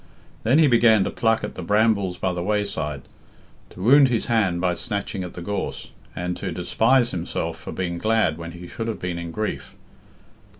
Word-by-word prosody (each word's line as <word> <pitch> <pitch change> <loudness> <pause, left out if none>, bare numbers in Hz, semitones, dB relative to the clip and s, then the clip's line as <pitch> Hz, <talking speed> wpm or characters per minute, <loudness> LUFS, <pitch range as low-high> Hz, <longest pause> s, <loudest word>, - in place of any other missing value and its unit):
Then 125 +6 +3
he 160 - +6
began 115 -5 +5
to - - -2
pluck 115 -1 +1
at - - -4
the - - -7
brambles 100 -1 +2
by 95 -1 -1
the 90 - -3
wayside, 100 -8 -2 0.7
to 90 - -9
wound 135 +5 +7
his 120 -3 0
hand 100 -7 +1
by 90 0 +1
snatching 100 -2 -4
at 90 - -8
the 85 - -6
gorse, 100 +3 -4 0.2
and 90 +1 -3
to - - -4
despise 115 +8 +2
himself 85 -2 -3
for - - -8
being 85 -2 -3
glad 110 -6 +2
when 85 0 -7
he 90 0 -9
should 115 +5 -5
have 115 - -3
been 90 -1 -3
in 85 0 -5
grief. 105 +5 -4
100 Hz, 195 wpm, -23 LUFS, 90-115 Hz, 0.7 s, wound